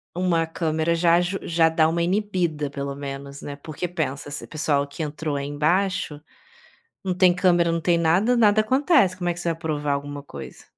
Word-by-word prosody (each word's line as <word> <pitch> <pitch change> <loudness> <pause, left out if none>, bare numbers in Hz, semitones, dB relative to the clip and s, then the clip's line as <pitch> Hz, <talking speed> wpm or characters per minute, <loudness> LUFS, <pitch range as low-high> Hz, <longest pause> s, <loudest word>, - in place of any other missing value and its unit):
uma 175 -2 +1
câmera 160 0 -1
já 170 0 +4
aju 180 +2 0
já 165 -1 +2
dá 160 -1 +3
uma 170 +1 0
inibida, 175 -6 -1
pelo 140 0 -4
menos, 140 0 -7
né. 145 - -6
Porque 155 +4 -5
pensa, 145 -5 -3
esse 145 - -5
pessoal 145 -2 0
que 140 +3 -8
entrou 150 0 -3
aí 140 0 -3
embaixo, 160 +2 0 0.8
não 185 - -1
tem 180 0 +4
câmera, 175 -2 +3
não 165 - 0
tem 170 +1 +2
nada, 175 +9 +3
nada 215 -2 +4
acontece. 260 - +3
Como 175 -1 -2
é - - +1
que 170 - -10
você 175 - -1
vai 165 - -13
provar 150 -3 -1
alguma 145 0 -5
coisa? - - -10
165 Hz, 195 wpm, -24 LUFS, 145-180 Hz, 0.8 s, já